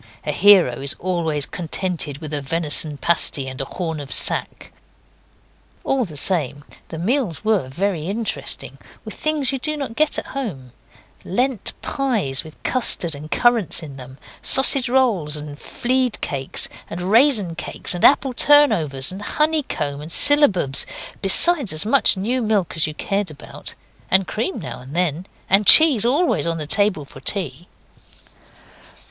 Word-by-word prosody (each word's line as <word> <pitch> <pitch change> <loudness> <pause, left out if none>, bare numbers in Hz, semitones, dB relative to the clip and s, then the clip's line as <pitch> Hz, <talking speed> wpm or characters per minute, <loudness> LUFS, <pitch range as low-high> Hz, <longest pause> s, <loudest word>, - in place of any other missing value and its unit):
A 150 - -1
hero 180 -8 +3
is 140 0 -1
always 165 -5 -2
contented 170 -3 -5
with 155 0 -8
a 145 - -2
venison 150 0 0
pasty 145 -4 +1
and 130 0 -7
a - - -4
horn 160 0 -6
of 140 -2 -9
sack. - - +4 1.1
All 265 -3 -1
the 155 -6 -5
same, 145 -4 +1 0.2
the 160 - -9
meals 215 - -3
were 215 -11 0
very 170 +2 -3
interesting; 220 +3 -5 0.3
with - - -7
things 305 -4 -1
you 270 - -4
do 305 +4 -3
not 270 -6 -6
get 310 +2 0
at - - -5
home 175 - -7 0.5
Lent 245 +3 -3
pies 220 - -3
with 155 -1 -16
custard 230 -9 -1
and 150 +2 -10
currants 230 -6 +1
in 140 -3 -11
them, 130 0 -12 0.2
sausage 265 -1 +2
rolls 215 - +1
and 145 0 -10
fiede 255 -1 -2
cakes, 135 -1 -2 0.2
and 170 - -7
raisin 215 - +3
cakes 165 - -1
and 175 - -6
apple 270 -2 +3
turnovers, 170 - +3
and 190 +2 -9
honeycomb 265 - -2
and 155 +2 -10
syllabubs, 195 - +2 0.3
besides 275 - +6
as 155 +5 -3
much 235 -3 +3
new 240 +7 -2
milk 210 -5 -1
as 160 - 0
you 155 - -8
cared 200 +1 -3
about, 150 -3 -10 0.3
and 190 0 +2
cream 235 - -4
now 165 - -8
and 130 +4 -12
then, 175 0 -2 0.2
and 195 +1 +2
cheese 305 -9 +8
always 295 - 0
on 165 0 -2
the 155 - -5
table 190 -2 0
for 135 - -14
tea. 170 0 -1
185 Hz, 155 wpm, -19 LUFS, 150-245 Hz, 1.1 s, cheese